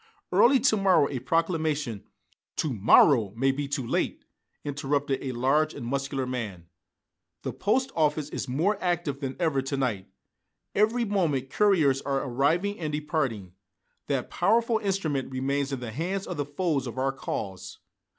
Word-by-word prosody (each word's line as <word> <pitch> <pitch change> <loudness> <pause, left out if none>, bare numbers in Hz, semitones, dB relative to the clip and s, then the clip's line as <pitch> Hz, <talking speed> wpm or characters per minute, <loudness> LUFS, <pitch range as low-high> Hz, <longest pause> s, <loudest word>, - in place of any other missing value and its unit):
Early 235 +9 +5
to 220 -3 +3
morrow 190 -7 +4
a 130 - -2
proclamation 155 - -1 0.2
" - - -42
"To 150 -4 -1
morrow 110 0 +5
may 135 +2 +3
be 140 +1 -3
too 140 -2 -2
late," - - -1 0.4
interrupted 140 -1 -1
a 135 - -3
large 140 +6 +1
and - - -6
muscular 135 +1 -2
man. 110 -9 -5 0.8
"The - - -3
post 255 +7 0
office 150 -2 +1
is 145 - -4
more 170 +11 0
active 175 -6 -1
than 135 -2 -4
ever 160 -6 +1
to 135 +1 -3
night. 110 -8 -2 0.6
Every 225 +4 +2
moment 155 - 0
couriers 160 -10 +3
are 135 -1 -1
arriving 155 +11 +1
and 155 -3 -3
departing. 145 - -2 0.5
That - - -2
powerful 230 0 +2
instrument 175 -11 -1
remains 140 +2 -1
in 135 -2 -3
the 120 -2 -5
hands 180 - -3
of - - -5
the 145 - -1
foes 145 -2 -1
of 120 - -7
our 135 +1 +1
cause! 95 -8 -5
140 Hz, 160 wpm, -27 LUFS, 130-175 Hz, 0.8 s, Early